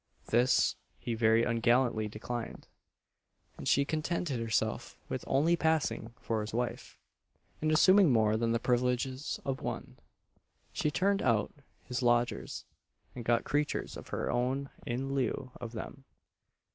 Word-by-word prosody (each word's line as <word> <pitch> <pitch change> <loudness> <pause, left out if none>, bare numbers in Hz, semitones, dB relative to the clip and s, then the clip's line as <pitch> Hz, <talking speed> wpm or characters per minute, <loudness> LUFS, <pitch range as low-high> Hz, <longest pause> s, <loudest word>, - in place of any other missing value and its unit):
This 125 +2 +3 0.2
he 120 - -4
very 115 0 +4
ungallantly 115 -1 +2
declined; 115 +2 -6 0.9
and - - -7
she 140 - +4
contented 155 -3 -1
herself 110 -1 -1
with - - -3
only 155 +6 +3
passing 160 -8 0
for 110 -1 -1
his 105 +1 -5
wife, 120 0 -3 0.6
and 155 0 +1
assuming 185 +1 +6
more 110 -2 +3
than 115 +1 +1
the 115 - +3
privileges 125 +2 0
of 135 -1 -2
one. - - -5 0.7
She 150 - 0
turned 195 +5 +1
out 115 -5 +1 0.3
his 125 0 -3
lodgers, 120 0 0 0.5
and 120 - -7
got 115 0 +2
creatures 145 0 -1
of - - -9
her - - -2
own 130 +3 -1 0.2
in 130 +3 -2
lieu 130 -1 -1
of 120 -1 -6
them. 130 +4 -7
125 Hz, 135 wpm, -31 LUFS, 115-140 Hz, 0.9 s, assuming